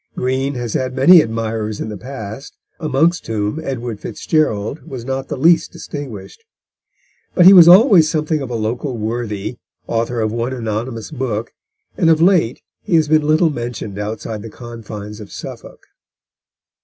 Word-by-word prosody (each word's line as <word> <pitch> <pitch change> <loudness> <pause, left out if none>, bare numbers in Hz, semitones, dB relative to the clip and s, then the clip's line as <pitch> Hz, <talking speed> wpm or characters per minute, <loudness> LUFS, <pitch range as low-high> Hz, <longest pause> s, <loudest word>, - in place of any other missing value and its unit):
Green 130 +2 -1
has 120 -3 -4
had 130 0 -2
many 165 +6 +7
admirers 110 -3 -3
in - - -4
the 105 - -6
past, 115 +2 -8 0.2
amongst 160 +3 +1
whom 105 +5 -2
Edward 120 -7 -5
FitzGerald 140 -4 -1
was 130 -6 -7
not 135 0 -3
the - - -4
least 165 +4 +3
distinguished. 140 - -8 0.9
But 175 - +5
he 190 - +10
was 175 -3 +9
always 180 - +7
something 155 -1 -1
of 135 - -5
a 120 - -3
local 120 +4 -3
worthy, 110 0 -4 0.3
author 115 +1 -2
of 110 -1 0
one 120 +3 -2
anonymous 115 +1 -4
book, 120 -6 -3 0.5
and 165 - +3
of 160 -1 +4
late 170 -9 +2 0.2
he 170 - 0
has 160 -2 +3
been 155 -1 +3
little 155 +1 +3
mentioned 120 -6 -5
outside 110 +1 -5
the 115 - -8
confines 110 -3 -9
of 105 -2 -11
Suffolk. - - -10
125 Hz, 155 wpm, -18 LUFS, 110-155 Hz, 0.9 s, he